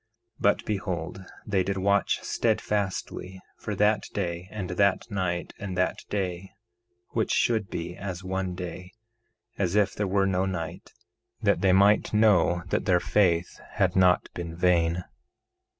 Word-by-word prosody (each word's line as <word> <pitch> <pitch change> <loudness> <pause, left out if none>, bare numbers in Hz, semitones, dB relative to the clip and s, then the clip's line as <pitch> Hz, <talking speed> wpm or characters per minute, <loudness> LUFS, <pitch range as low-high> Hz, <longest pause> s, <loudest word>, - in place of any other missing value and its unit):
1:8 - - -16
But 100 - +2
behold, 95 -3 -3 0.2
they 100 -3 +1
did 95 +1 -2
watch 100 +1 +1
steadfastly 95 -2 -1 0.2
for 105 - -5
that 105 0 +2
day 90 -2 -3
and 95 -4 -5
that 100 +4 +1
night 90 -3 -2
and 95 -3 -5
that 90 - +1
day 95 -2 -3 0.6
which - - -1
should 110 -5 +1
be 85 +1 -5
as 95 -2 -6
one 95 -1 -2
day 90 0 -7 0.7
as 95 -1 0
if 105 -2 +3
there 105 - -2
were 95 +1 +2
no 95 0 +1
night, 85 -4 -5 0.5
that - - +2
they 95 - +4
might 100 +3 +4
know 90 -5 +4
that - - 0
their 90 -3 +4
faith 90 -3 +1
had 95 -3 +1
not 90 -1 +4
been 85 -1 -6
vain. 85 0 +2
95 Hz, 150 wpm, -27 LUFS, 90-100 Hz, 0.7 s, they